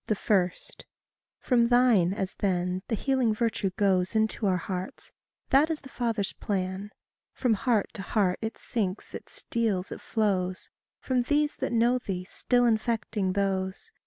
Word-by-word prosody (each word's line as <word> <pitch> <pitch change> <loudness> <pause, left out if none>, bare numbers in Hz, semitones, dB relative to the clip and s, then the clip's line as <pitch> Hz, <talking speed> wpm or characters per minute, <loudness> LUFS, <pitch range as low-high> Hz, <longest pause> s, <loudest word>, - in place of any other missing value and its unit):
1. 185 -4 +4 0.9
FROM 240 -2 +2
thine, 240 -8 +4
as 195 -1 -3
then, 180 -1 0
the 225 - 0
healing 250 -1 +1
virtue 225 -3 0
goes 190 0 +2
Into 220 -1 +1
our 185 -1 +2
hearts 185 +1 -6 0.4
that 285 +4 +5
is 320 -2 -2
the 270 - -12
Father's 225 -5 -1
plan. 190 0 -3 0.4
From 245 -4 +1
heart 220 -1 +1
to 200 - -7
heart 195 -1 +1
it 220 0 -4
sinks, 200 -4 -3
it - - -8
steals, 215 -6 -1
it - - -7
flows, 185 -4 -1 0.3
From 255 -2 0
these 295 +4 +1
that - - -2
know 240 +2 +3
thee 185 -6 -4
still 245 +6 +1
infecting 220 -4 0
those. 195 - -2
210 Hz, 150 wpm, -28 LUFS, 190-240 Hz, 0.9 s, that